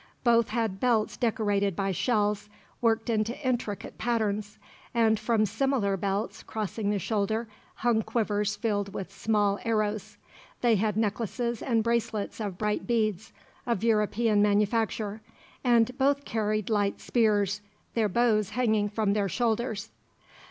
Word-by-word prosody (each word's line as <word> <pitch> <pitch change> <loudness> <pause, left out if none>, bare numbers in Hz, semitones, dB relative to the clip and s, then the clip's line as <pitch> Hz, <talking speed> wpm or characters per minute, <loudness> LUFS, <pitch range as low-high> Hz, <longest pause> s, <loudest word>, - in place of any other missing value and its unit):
Both 235 -2 +4
had 220 -4 -1
belts 225 -3 +2
decorated 205 -5 0
by 195 +1 0
shells, 210 0 0 0.3
worked 225 -1 +2
into 225 +1 0
intricate 240 -5 -2
patterns; 215 -3 -1 0.4
and 220 -2 +3
from 220 -1 +2
similar 220 -1 +1
belts, 195 +3 -2
crossing 215 -1 -3
the 205 - +1
shoulder, 220 +3 -1 0.3
hung 230 -1 +2
quivers 210 -2 0
filled 205 -4 -2
with 195 0 -5
small 205 -2 +1
arrows. 215 -2 -1 0.4
They 240 -2 +4
had 210 +1 0
necklaces 230 +2 -1
and 230 -3 +1
bracelets 230 -3 -1
of 200 -5 -4
bright 210 0 -1
beads, 220 -4 0 0.4
of 230 -4 0
European 215 -1 +2
manufacture; 210 +1 +1 0.4
and 240 -1 +3
both 280 +1 +2
carried 215 -1 -1
light 205 -2 +1
spears, 205 -4 +1 0.3
their 220 -3 +1
bows 215 -1 +2
hanging 220 -4 +2
from 210 -1 0
their 200 -2 0
shoulders. 225 -1 -1
215 Hz, 130 wpm, -28 LUFS, 205-230 Hz, 0.4 s, Both